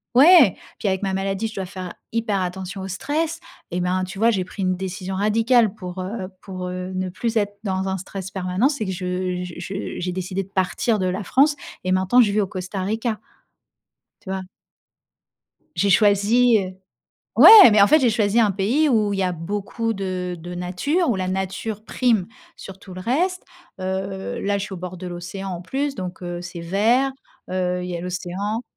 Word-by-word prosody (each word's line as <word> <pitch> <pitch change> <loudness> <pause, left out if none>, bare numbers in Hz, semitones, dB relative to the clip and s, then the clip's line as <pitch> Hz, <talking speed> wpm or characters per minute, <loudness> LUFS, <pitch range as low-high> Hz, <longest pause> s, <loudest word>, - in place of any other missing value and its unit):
ouais, 290 - +8 0.2
puis 205 - -2
avec 190 +1 0
ma 195 - -1
maladie, 195 +3 -1
je 220 - -10
dois 190 -1 -3
faire 185 -1 -7 0.2
hyper 220 -4 0
attention 185 +1 -4
au 190 - -5
stress. 315 - -2 0.3
Et 180 +1 -1
ben, 185 +1 0
tu 195 +1 -9
vois, 230 +2 +4
j'ai 185 -4 -1
pris 195 - -8
une 185 0 +1
décision 190 0 -5
radicale 220 +2 +3
pour, 185 -3 -8
heu, 185 +1 -4
pour, 185 -2 -6
heu, 185 +1 -5
ne 185 0 -2
plus 230 +5 -3
être 205 -2 0
dans 190 0 -1
un 190 - -1
stress 190 0 -7
permanent, 185 +6 +1
c'est 275 -7 -3
que 190 - -3
je 180 0 -3
je 180 -2 -8
je 195 +2 -5
j'ai 180 0 -2
décidé 185 +1 -3
de - - -16
partir 195 +4 0
de 185 -2 0
la 185 +3 -2
France 290 +6 +3 0.3
et 185 - -1
maintenant 190 +6 +4
je 210 -4 +3
vis 210 - +1
au 195 - -1
Costa 185 0 -5
Rica. 220 +2 -2 1.0
Tu - - -11
vois? 190 0 -3 1.3
J'ai 200 - +2
choisi 215 +4 +4
heu, 185 -1 -5 0.6
ouais, 425 - +11
mais 210 -1 +6
en - - +7
fait, 310 +8 +6
j'ai 255 - +4
choisi 215 0 +2
un 215 - +4
pays 220 +11 +1
où 215 -5 +2
il 195 - -2
y - - +1
a 180 -1 0
beaucoup 205 +6 -3
de 185 -3 -3
de 175 +2 -7
nature, 185 - -1
où 225 - +1
la 185 -1 -2
nature 190 +3 -3
prime 225 -7 +1 0.3
sur 195 -1 -10
tout 190 -1 -12
le 185 - -7
reste. 355 - 0 0.3
Heu, 190 +1 -4
là, 200 0 0
je 200 - -3
suis 205 - -9
au 190 - -5
bord 180 +1 -6
de 180 +1 -7
l'océan 180 +2 -6
en 175 -2 -5
plus, 270 +10 -2
donc 185 -5 -6
heu, 175 0 -4
c'est 175 -1 -7
vert, 225 +10 +2 0.4
heu, 180 -1 -1
il 180 - -5
y 175 - -3
a - - -5
l'océan. 185 +5 -3
190 Hz, 205 wpm, -22 LUFS, 185-220 Hz, 1.3 s, ouais